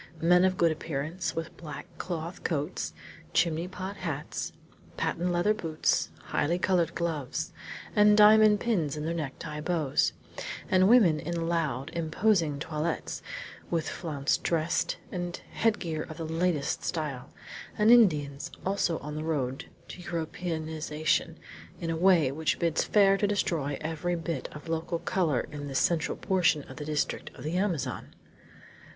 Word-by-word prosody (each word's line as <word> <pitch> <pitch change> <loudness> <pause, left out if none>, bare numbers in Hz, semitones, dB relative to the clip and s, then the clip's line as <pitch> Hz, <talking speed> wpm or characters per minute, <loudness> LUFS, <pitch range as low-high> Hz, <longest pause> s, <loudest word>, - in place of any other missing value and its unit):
Men 180 +2 +5
of 185 0 +1
good 170 -1 +4
appearance, 155 +2 -3
with 165 0 -4
black 150 -4 -7
cloth 170 0 -5
coats, 155 +1 -2 0.4
chimney 170 0 +2
pot 190 +2 -6
hats, 155 -5 -4 0.5
patent 175 +2 0
leather 175 +5 +3
boots, 165 -7 0
highly 170 +4 0
colored 180 -3 +1
gloves, 160 -6 -2 0.4
and 210 0 +6
diamond 215 0 +7
pins 165 -11 0
in 150 - -3
their 165 - -1
necktie 150 -1 -5
bows; 155 -4 +1 0.6
and 185 +1 +5
women 200 -11 +6
in 165 +1 -2
loud, 155 -5 -1
imposing 165 -1 +1
toilets, 155 +2 -3 0.5
with 165 -2 0
flounced 145 -5 -1
dressed 165 -1 0
and 175 -1 -4
headgear 180 -8 0
of 155 - -7
the 165 - -4
latest 165 -2 0
style; 150 -7 -3 0.5
and 215 +2 +5
Indians, 155 -10 +4 0.2
also 190 -4 +1
on 150 +1 -6
the 155 +1 -4
road 135 -5 -2 0.2
to 180 - -8
Europeanization 160 -2 -2 0.4
in 165 -2 -2
a - - 0
way 170 -5 +4
which 155 +2 0
bids 165 -2 +1
fair 195 -2 +5
to 205 - +1
destroy 160 -8 0
every 160 +2 -2
bit 165 -4 -3
of 150 +2 -10
local 165 +1 -1
color 165 -7 +1
in 145 -1 -6
this 135 -1 -2
central 160 -1 +1
portion 175 -6 +2
of 130 - -12
the 150 - -5
district 150 -1 -1
of - - -10
the 155 +3 -2
Amazon! 180 -6 -2
165 Hz, 145 wpm, -29 LUFS, 150-180 Hz, 0.6 s, diamond